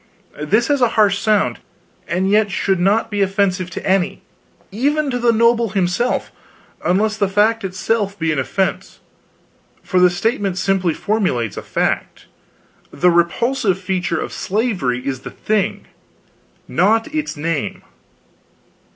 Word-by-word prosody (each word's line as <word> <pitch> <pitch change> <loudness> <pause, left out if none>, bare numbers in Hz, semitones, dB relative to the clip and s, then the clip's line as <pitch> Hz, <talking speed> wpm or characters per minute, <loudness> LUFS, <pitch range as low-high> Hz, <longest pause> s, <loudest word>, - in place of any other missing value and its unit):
This 210 +10 +2
has 285 -2 +2
a 245 - +5
harsh 205 -2 +4
sound, 205 - +1 0.5
and 185 +3 0
yet 210 +1 +3
should 190 0 0
not 205 +5 +2
be 205 -1 -1
offensive 190 -2 0
to - - -6
any 190 0 0 0.5
even 285 +7 0
to 245 - -1
the 235 -1 +3
noble 230 0 +3
himself 190 +6 0 0.5
unless 210 +4 +1
the 200 -2 +1
fact 215 +3 +2
itself 200 +2 -1
be 160 -1 0
an 150 - 0
offense: 190 +8 -2 0.8
for 185 - +1
the 180 0 +6
statement 195 0 -1
simply 185 -3 +1
formulates 155 - -1
a - - -5
fact. - - -2 0.6
The 180 0 +2
repulsive 190 +5 +1
feature 185 -3 -2
of - - -5
slavery 185 - -1
is 135 -2 -2
the - - -8
thing, 215 -2 -1 0.8
not 225 - +1
its 305 - -3
name. 155 -1 -3
195 Hz, 135 wpm, -19 LUFS, 180-220 Hz, 0.8 s, the